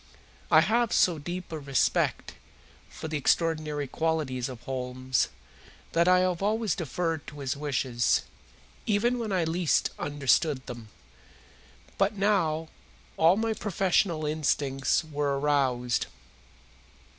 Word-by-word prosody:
I -, -, +7 dB
have 235 Hz, 0 st, +1 dB
so 170 Hz, -4 st, +3 dB
deep 175 Hz, +4 st, -6 dB
a 160 Hz, -, -4 dB
respect 140 Hz, -2 st, 0 dB, 0.6 s
for -, -, -7 dB
the 155 Hz, -1 st, -2 dB
extraordinary 155 Hz, -1 st, +1 dB
qualities 140 Hz, -5 st, -1 dB
of 125 Hz, -3 st, -9 dB
Holmes 130 Hz, 0 st, -1 dB, 0.6 s
that 170 Hz, +1 st, +2 dB
I 180 Hz, 0 st, +5 dB
have 185 Hz, -1 st, 0 dB
always 215 Hz, 0 st, +1 dB
deferred 165 Hz, -2 st, -3 dB
to 145 Hz, -, -9 dB
his 135 Hz, -1 st, -2 dB
wishes, 130 Hz, -4 st, 0 dB, 0.6 s
even 235 Hz, +4 st, +2 dB
when 220 Hz, -3 st, -3 dB
I 185 Hz, -3 st, +1 dB
least 165 Hz, -1 st, +1 dB
understood 145 Hz, 0 st, +1 dB
them. 115 Hz, -3 st, -9 dB, 1.1 s
But 200 Hz, +1 st, +2 dB
now 165 Hz, -6 st, +1 dB, 0.5 s
all 165 Hz, +4 st, +4 dB
my 225 Hz, 0 st, 0 dB
professional 190 Hz, -5 st, 0 dB
instincts 145 Hz, -1 st, 0 dB
were 145 Hz, -2 st, -1 dB
aroused. 130 Hz, -4 st, +1 dB
155 Hz, 120 wpm, -28 LUFS, 135-180 Hz, 1.1 s, I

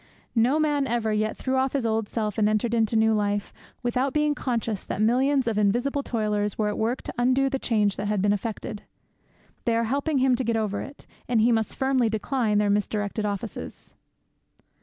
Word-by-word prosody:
No 245 Hz, +5 st, +3 dB
man 295 Hz, -3 st, +1 dB
ever 225 Hz, -2 st, 0 dB
yet 215 Hz, +1 st, -1 dB
threw 260 Hz, 0 st, -1 dB
on 265 Hz, +1 st, +2 dB
his 275 Hz, -4 st, 0 dB
old 220 Hz, -1 st, 0 dB
self 215 Hz, -2 st, -2 dB
and 210 Hz, 0 st, +3 dB
entered 215 Hz, +2 st, 0 dB
into 225 Hz, -1 st, +1 dB
new 220 Hz, 0 st, +4 dB
life 205 Hz, -1 st, -1 dB, 0.3 s
without 250 Hz, +2 st, 0 dB
being 300 Hz, -1 st, +2 dB
conscious 230 Hz, -7 st, -2 dB
that -, -, -5 dB
millions 260 Hz, +5 st, +3 dB
of 225 Hz, -2 st, 0 dB
invisible 240 Hz, +8 st, +1 dB
toilers 210 Hz, -5 st, -1 dB
were 210 Hz, -1 st, +1 dB
at 210 Hz, -, -3 dB
work 230 Hz, +4 st, -1 dB
to -, -, -6 dB
undo 260 Hz, +2 st, +2 dB
the 270 Hz, -, -1 dB
change 210 Hz, -5 st, +1 dB
that 205 Hz, -, -3 dB
had 210 Hz, -1 st, 0 dB
been 205 Hz, +2 st, +3 dB
effected. 210 Hz, +1 st, -4 dB, 0.8 s
They 230 Hz, -, +2 dB
are 230 Hz, -, +2 dB
helping 280 Hz, +5 st, 0 dB
him 260 Hz, -1 st, +3 dB
to 260 Hz, -, -1 dB
get 230 Hz, -1 st, 0 dB
over 210 Hz, -2 st, -1 dB
it, 280 Hz, +1 st, -10 dB, 0.2 s
and 240 Hz, -2 st, +3 dB
he 230 Hz, +3 st, +4 dB
must 225 Hz, -2 st, 0 dB
firmly 265 Hz, -3 st, +2 dB
decline 220 Hz, 0 st, 0 dB
their 205 Hz, -1 st, +2 dB
misdirected 210 Hz, +1 st, -1 dB
offices. 205 Hz, +2 st, -6 dB
225 Hz, 200 wpm, -25 LUFS, 210-260 Hz, 0.8 s, new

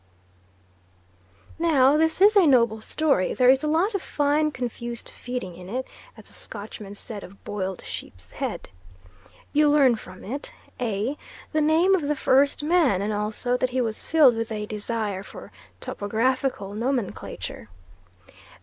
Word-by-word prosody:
Now 290 Hz, -5 st, +4 dB
this 320 Hz, +3 st, +1 dB
is 420 Hz, +2 st, +7 dB
a 385 Hz, -5 st, +6 dB
noble 235 Hz, -5 st, +3 dB
story 280 Hz, -6 st, +1 dB
there 255 Hz, 0 st, +6 dB
is 265 Hz, +2 st, +2 dB
a -, -, 0 dB
lot 335 Hz, +8 st, +2 dB
of 395 Hz, -, -1 dB
fine 295 Hz, +1 st, +1 dB
confused 240 Hz, -3 st, -5 dB
feeding 245 Hz, -8 st, -6 dB
in 180 Hz, +1 st, -11 dB
it, 255 Hz, +4 st, -3 dB, 0.3 s
as -, -, -13 dB
the -, -, -9 dB
Scotchman 205 Hz, -1 st, -6 dB
said 205 Hz, 0 st, -7 dB
of 195 Hz, +2 st, -14 dB
boiled 190 Hz, -2 st, -4 dB
sheep's 90 Hz, -2 st, -8 dB
head. -, -, -4 dB, 0.8 s
You 300 Hz, 0 st, +4 dB
learn 280 Hz, -5 st, +5 dB
from 185 Hz, -4 st, -11 dB
it 280 Hz, -, -6 dB, 0.3 s
A. 235 Hz, +4 st, -2 dB, 0.3 s
The 310 Hz, -, +1 dB
name 320 Hz, +5 st, +4 dB
of 380 Hz, -, +3 dB
the 295 Hz, 0 st, 0 dB
first 275 Hz, +2 st, +3 dB
man, 300 Hz, -, +3 dB
and 210 Hz, +1 st, -1 dB
also 215 Hz, +4 st, -1 dB
that 255 Hz, -, 0 dB
he 255 Hz, +1 st, -1 dB
was 225 Hz, -3 st, -1 dB
filled 295 Hz, -7 st, +5 dB
with 225 Hz, 0 st, -3 dB
a 210 Hz, -1 st, -3 dB
desire 210 Hz, -2 st, -3 dB
for -, -, -11 dB, 0.3 s
topographical 225 Hz, 0 st, -1 dB
nomenclature. 230 Hz, -, -4 dB
250 Hz, 150 wpm, -25 LUFS, 210-295 Hz, 0.8 s, is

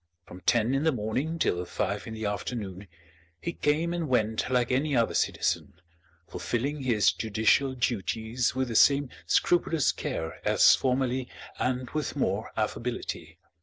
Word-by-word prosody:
From 90 Hz, -, -12 dB
ten 120 Hz, +1 st, +3 dB
in 135 Hz, +2 st, +1 dB
the 160 Hz, -, +3 dB
morning 130 Hz, +7 st, -2 dB
till 90 Hz, -, 0 dB
five 100 Hz, +3 st, -3 dB
in 110 Hz, -, -6 dB
the 110 Hz, -1 st, -4 dB
afternoon, 100 Hz, -2 st, -4 dB, 0.5 s
he 170 Hz, -, -4 dB
came 160 Hz, +3 st, 0 dB
and 170 Hz, -4 st, -2 dB
went 110 Hz, -3 st, +1 dB
like 125 Hz, -1 st, +1 dB
any 140 Hz, +3 st, +1 dB
other 115 Hz, -2 st, +2 dB
citizen, -, -, 0 dB, 0.5 s
fulfilling 140 Hz, +5 st, -3 dB
his 115 Hz, -5 st, +3 dB
judicial 110 Hz, +5 st, +1 dB
duties 115 Hz, +1 st, -1 dB
with 130 Hz, -1 st, -1 dB
the 115 Hz, -, -4 dB
same 140 Hz, +3 st, +5 dB, 0.2 s
scrupulous 165 Hz, -4 st, +2 dB
care 80 Hz, -1 st, -5 dB
as -, -, +6 dB
formerly 130 Hz, -1 st, 0 dB, 0.3 s
and 125 Hz, -1 st, -1 dB
with 155 Hz, -1 st, -3 dB
more -, -, -1 dB
affability. -, -, -3 dB
125 Hz, 145 wpm, -28 LUFS, 110-140 Hz, 0.5 s, as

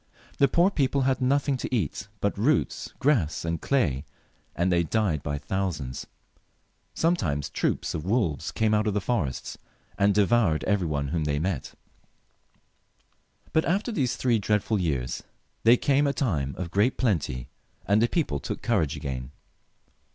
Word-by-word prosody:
The 140 Hz, -, +6 dB
poor 175 Hz, +8 st, +3 dB
people 140 Hz, -4 st, +1 dB
had 130 Hz, 0 st, +1 dB
nothing 140 Hz, +1 st, +2 dB
to -, -, -5 dB
eat 100 Hz, -, -1 dB
but 100 Hz, -, +1 dB
roots, 125 Hz, +10 st, 0 dB
grass, 115 Hz, -, +1 dB
and 85 Hz, -1 st, -2 dB
clay, 75 Hz, -, +1 dB, 0.5 s
and 90 Hz, +2 st, +1 dB
they 85 Hz, -1 st, +3 dB
died 85 Hz, -3 st, 0 dB
by 75 Hz, 0 st, -3 dB
thousands. 75 Hz, -4 st, -3 dB, 0.9 s
Sometimes 90 Hz, -, 0 dB
troops -, -, -1 dB
of 75 Hz, -, -3 dB
wolves 95 Hz, -, 0 dB
came 110 Hz, -1 st, +1 dB
out 105 Hz, +1 st, +2 dB
of 105 Hz, -, 0 dB
the -, -, +3 dB
forests, 95 Hz, -, -2 dB, 0.4 s
and 100 Hz, 0 st, +4 dB
devoured 105 Hz, -5 st, +3 dB
every 100 Hz, -4 st, +1 dB
one 70 Hz, -2 st, -1 dB
whom 80 Hz, -1 st, -1 dB
they 75 Hz, -1 st, 0 dB
met. 80 Hz, -2 st, -3 dB, 1.8 s
But 160 Hz, -, +3 dB
after 200 Hz, +8 st, 0 dB
these 130 Hz, -, 0 dB
three 120 Hz, -3 st, +2 dB
dreadful 105 Hz, 0 st, +1 dB
years 70 Hz, -7 st, -1 dB, 0.4 s
there 115 Hz, +2 st, +6 dB
came 140 Hz, +2 st, +2 dB
a 140 Hz, -, +1 dB
time 75 Hz, -, -1 dB
of 85 Hz, -2 st, -4 dB
great 105 Hz, +6 st, +2 dB
plenty, 80 Hz, -, -1 dB, 0.4 s
and 100 Hz, +2 st, +3 dB
the 120 Hz, -, +4 dB
people 120 Hz, -, -1 dB
took -, -, -5 dB
courage 75 Hz, -2 st, +1 dB
again. 65 Hz, -4 st, -5 dB
100 Hz, 155 wpm, -26 LUFS, 75-125 Hz, 1.8 s, The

